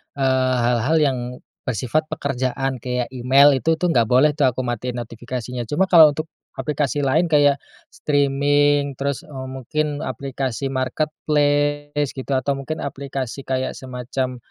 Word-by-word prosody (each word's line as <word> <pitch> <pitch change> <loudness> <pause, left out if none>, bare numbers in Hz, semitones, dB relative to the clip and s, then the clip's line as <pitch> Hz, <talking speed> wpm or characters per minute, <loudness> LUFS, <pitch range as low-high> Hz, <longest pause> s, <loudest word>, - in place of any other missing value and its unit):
eee, 130 -2 +2
hal-hal 120 +6 +2
yang, 135 -4 +2 0.4
bersifat 125 +6 0
pekerjaan 135 0 -2
kayak 125 0 -3
email 135 +3 +5
itu 160 +4 0
tuh 180 - +1
nggak 125 -9 +3
boleh 145 +4 +4
tuh 150 - +1
aku 125 +1 -4
matiin 120 0 -3
notifikasinya, 120 +1 -5
cuma 155 +11 0
kalau 160 -5 +8
untuk, 155 +2 -5 0.3
aplikasi 145 -1 -1
lain 160 +6 +3
kayak, 145 -1 +5 0.4
streaming 145 0 +2
terus, 140 -1 -2
eee, 135 -3 -8
mungkin 145 +3 -3
aplikasi 135 -1 -3
marketplace 145 +1 0
gitu, 135 +1 -7
atau 130 +2 0
mungkin 155 +3 -4
aplikasi 135 -2 -5
kayak 130 -1 -2
semacam, 130 0 -4
135 Hz, 135 wpm, -21 LUFS, 130-145 Hz, 0.4 s, kalau